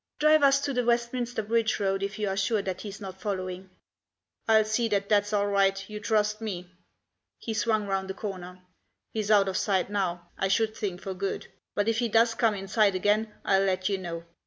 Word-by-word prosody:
Drive 305 0 +5
us 275 -1 +5
to 285 -1 -2
the 250 -1 +1
Westminster 235 -1 0
Bridge 225 +1 +1
Road, 195 -1 0
if 200 +1 -3
you 210 -1 -1
are 195 - -1
sure 200 +2 +1
that 185 -1 -4
he's 205 -1 -7
not 190 -2 -8
following." 185 -2 -4 0.8
"I'll 220 -1 +5
see 220 +2 +1
that 200 -2 -1
that's 205 -1 +3
all 205 -1 +2
right, 195 -1 +1
you 210 0 -6
trust 215 0 0
me." 185 -5 -4 0.7
He 225 - -5
swung 220 -1 +1
round 195 -1 -2
a 190 - -4
corner. 185 -3 -7 0.2
" - - -53
He's 215 -2 -2
out 205 -2 +5
of 190 -1 -1
sight 195 -1 0
now, 175 -4 -2
I 195 - +1
should 220 +3 +1
think 190 -4 -4
for 190 - -4
good; 195 +1 -4 0.3
but 205 +1 +1
if 225 0 +1
he 240 -2 0
does 225 +1 +4
come 225 -2 +2
in 195 0 -6
sight 200 -1 +3
again 210 +3 +1
I'll 195 -1 +4
let 185 0 0
you 195 -1 -1
know. 170 -2 -6
205 Hz, 215 wpm, -27 LUFS, 190-220 Hz, 0.8 s, Drive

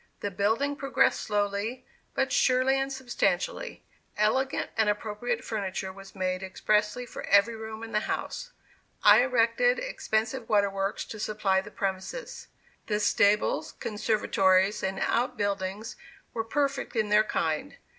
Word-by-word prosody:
The 205 - -2
building 225 +9 +1
progressed 275 -1 +2
slowly, 205 +4 -2 0.3
but 270 -1 +1
surely 255 +1 +3
and 270 0 -2
substantially. 475 - -2 0.3
Elegant 260 +6 +1
and 220 -2 +3
appropriate 220 +3 -2
furniture 190 -3 -3
was 195 +1 -13
made 185 -1 -1
expressly 210 +5 0
for - - -8
every 205 +3 +4
room 220 0 -7
in 225 - -7
the 210 - +2
house. - - -4 0.5
I 210 +3 +8
erected 255 - +3
expensive 240 - -2
water 205 -2 +3
works 195 0 -2
to 220 - -8
supply 205 -3 +1
the 200 - -10
premises. 195 - -4 0.4
The 210 -3 0
stables, 210 0 +2
conservatories 205 -2 +1
and 190 0 -2
out 245 +1 0
buildings 200 +1 -2 0.4
were 225 - -1
perfect 275 +2 -1
in 215 -2 +1
their 210 +1 +5
kind. 160 -7 -2
215 Hz, 135 wpm, -28 LUFS, 200-250 Hz, 0.5 s, I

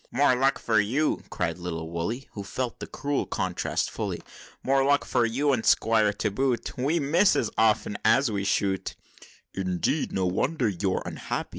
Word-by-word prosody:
"More 135 0 +3
luck 135 +2 +2
for 110 -3 +2
you!" 130 +10 +1
cried - - -2
little 80 -2 -4
Woolly, 105 +11 -3
Who 100 - -6
felt 120 +4 -4
the - - -6
cruel 145 -1 -2
contrast - - -2
fully; - - -4 0.4
"More 135 +1 +3
luck 145 +1 +2
for 120 -1 +2
you, 140 +5 +1
and 115 -4 0
Squire 110 -2 +3
to 105 0 -2
boot! 120 +1 -1
We 145 +7 0
miss 170 +7 +3
as 115 - 0
often 110 -2 +2
as 115 +3 +4
we 100 -1 -2
shoot!" 95 -1 0 0.6
"Indeed! 95 - -1
No 95 -1 0
wonder 125 - 0
you're 95 -1 -1
unhappy! - - -4
115 Hz, 170 wpm, -26 LUFS, 100-135 Hz, 0.6 s, as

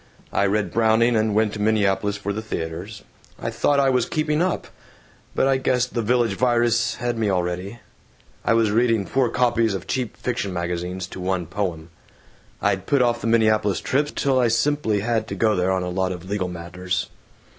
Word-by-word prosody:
I 100 - +2
read 105 +1 0
Browning, 115 +1 +3
and 110 -1 +1
went 110 -1 +2
to 105 - -5
Minneapolis 105 -1 +1
for 100 0 -3
the 110 - -3
theaters. 100 +1 -5 0.4
I - - -3
thought 145 -1 +2
I 135 -1 +3
was 125 -2 +1
'keeping 155 0 0
up.' 185 0 0 0.7
But - - +3
I 135 -1 +3
guess 125 -1 +1
the 120 -2 -3
Village 120 -1 +2
Virus 120 0 +2
had 120 -1 -2
me 110 -2 +1
already. 90 +3 -2 0.7
I 115 - +3
was 115 -2 +3
reading 115 -2 +2
four 130 +1 +1
copies 115 -4 +1
of 95 - -6
cheap 125 -4 -3
fiction 110 -5 -2
magazines 90 +1 -3
to 95 - -9
one 90 -1 -1
poem. 85 -2 -4 0.7
I'd - - 0
put 140 -3 +3
off 120 -1 +1
the - - -2
Minneapolis 110 -3 +3
trips 145 +2 0
till 135 -2 +2
I 125 - +3
simply 115 -2 +1
had 110 0 0
to 100 - -5
go 105 +2 +2
there 90 +1 +1
on 95 -1 0
a 90 - -3
lot 95 +1 -1
of 90 0 -7
legal 100 -2 -1
matters. 90 +1 -4
110 Hz, 190 wpm, -23 LUFS, 95-120 Hz, 0.7 s, Browning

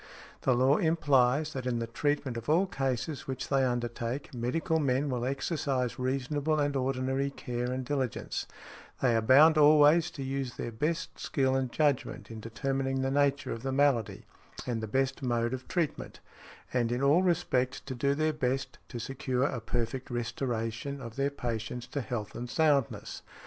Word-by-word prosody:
The 130 - +3
law 130 +4 +4
implies 150 -3 +2
that 130 -2 -4
in 120 -1 0
the 115 - -1
treatment 135 +2 -1
of 115 +4 -5
all 170 +5 +4
cases 135 -3 -2
which 130 -1 -4
they 135 -1 +3
undertake 120 +1 -2
medical 160 +8 0
men 140 0 +1
will 125 -1 -1
exercise 135 -2 -1
reasonable 140 +4 0
and 145 -1 +1
ordinary 135 +1 0
care 125 -2 -4
and 130 0 -3
diligence; 130 -3 -2 0.5
they 125 -3 +3
are 115 - +3
bound 150 +7 +6
always 150 +3 +6
to 135 - -3
use 135 -2 -3
their 120 - -4
best 155 +9 -2
skill 135 -4 +1
and 130 -2 0
judgment 145 -5 0
in 110 - -7
determining 135 +4 -2
the 135 0 0
nature 140 0 +1
of 115 - -4
the 135 +1 -2
malady 135 -5 +1 0.4
and 115 -3 -2
the 110 - -3
best 130 +6 0
mode 120 -1 0
of 130 0 -5
treatment, 170 -5 -2 0.5
and 120 -2 +1
in 125 +3 -1
all 145 +6 +5
respects 135 -8 +1
to 135 - -6
do 140 +3 +1
their 155 +1 +1
best 135 -2 -2
to 120 - -7
secure 130 +1 -2
a 135 -4 -1
perfect 120 +3 -3
restoration 120 +2 -3
of 115 -3 -8
their 140 +1 +1
patients 120 -3 -4
to 145 - -4
health 110 -4 -4
and 120 +1 -6
soundness. 145 -4 +1
130 Hz, 170 wpm, -30 LUFS, 120-145 Hz, 0.5 s, bound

